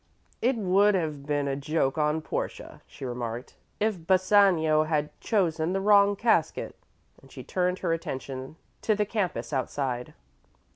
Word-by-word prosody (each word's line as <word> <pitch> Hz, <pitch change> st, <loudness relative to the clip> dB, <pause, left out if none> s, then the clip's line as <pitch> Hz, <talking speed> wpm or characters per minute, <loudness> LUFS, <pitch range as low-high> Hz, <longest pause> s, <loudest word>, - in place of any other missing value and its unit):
"It 250 Hz, +2 st, +2 dB
would 200 Hz, 0 st, +3 dB
have 150 Hz, -5 st, -3 dB
been 145 Hz, -1 st, 0 dB
a 135 Hz, -, -1 dB
joke 140 Hz, -1 st, 0 dB
on 155 Hz, 0 st, 0 dB
Portia," -, -, -5 dB
she 140 Hz, -, -9 dB
remarked, 120 Hz, -1 st, -5 dB, 0.2 s
"if 205 Hz, -6 st, -1 dB
Bassanio 185 Hz, -5 st, +4 dB
had 150 Hz, -1 st, -1 dB
chosen 175 Hz, -5 st, 0 dB
the 195 Hz, -, 0 dB
wrong 200 Hz, 0 st, +5 dB
casket"; 230 Hz, +2 st, +1 dB, 0.5 s
and -, -, -19 dB
she -, -, -9 dB
turned 180 Hz, 0 st, 0 dB
her 165 Hz, -, +2 dB
attention 135 Hz, -3 st, -5 dB, 0.3 s
to 215 Hz, -, +2 dB
the 210 Hz, 0 st, +1 dB
campus 200 Hz, -7 st, -2 dB
outside. 130 Hz, -2 st, -2 dB
160 Hz, 145 wpm, -27 LUFS, 145-200 Hz, 0.5 s, wrong